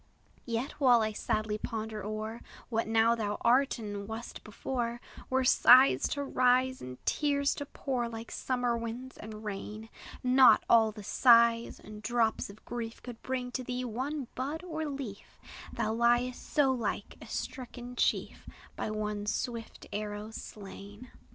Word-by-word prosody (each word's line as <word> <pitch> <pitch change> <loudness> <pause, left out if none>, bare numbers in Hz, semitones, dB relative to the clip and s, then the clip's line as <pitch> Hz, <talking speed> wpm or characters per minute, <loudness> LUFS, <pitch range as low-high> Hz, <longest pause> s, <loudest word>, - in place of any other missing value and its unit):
Yet, 235 +4 -2
while 245 -4 +6
I 215 - 0
sadly 215 0 -1
ponder 220 -2 -4
o'er 215 +2 -4 0.3
What 225 -1 0
now 225 +1 +4
thou 210 -3 -2
art, 260 +4 +3
and 205 -3 -5
wast 220 +2 -7
before, 235 +2 -3 0.3
Were 260 0 +2
sighs 255 +1 +7
to 285 - -2
rise, 255 -1 +2
and 125 0 -7
tears 280 -1 +1
to 285 - -6
pour, 250 -5 -2
Like 225 0 -8
summer 245 -2 0
winds 235 +3 -6
and 215 0 -9
rain; 210 +2 -6 0.3
Not 255 0 +6
all 225 -2 +5
the 210 -1 -10
sighs 235 +1 +4
and 210 0 -11
drops 225 -1 0
of 200 +2 -14
grief 235 -1 -5
Could 240 -2 -9
bring 250 -1 -3
to 255 - -3
thee 250 0 -3
one 260 +4 -3
bud 285 +6 -4
or 315 -3 -3
leaf; 270 -8 -7 0.3
Thou 220 - -1
liest 240 +2 +1
so 280 -3 +4
like 250 -3 -3
a - - -10
stricken 250 -1 -6
chief, - - 0 0.3
By - - -3
one 210 -1 -3
swift 230 +1 -4
arrow 210 +1 -4
slain. 205 +2 -10
235 Hz, 150 wpm, -31 LUFS, 215-255 Hz, 0.3 s, sighs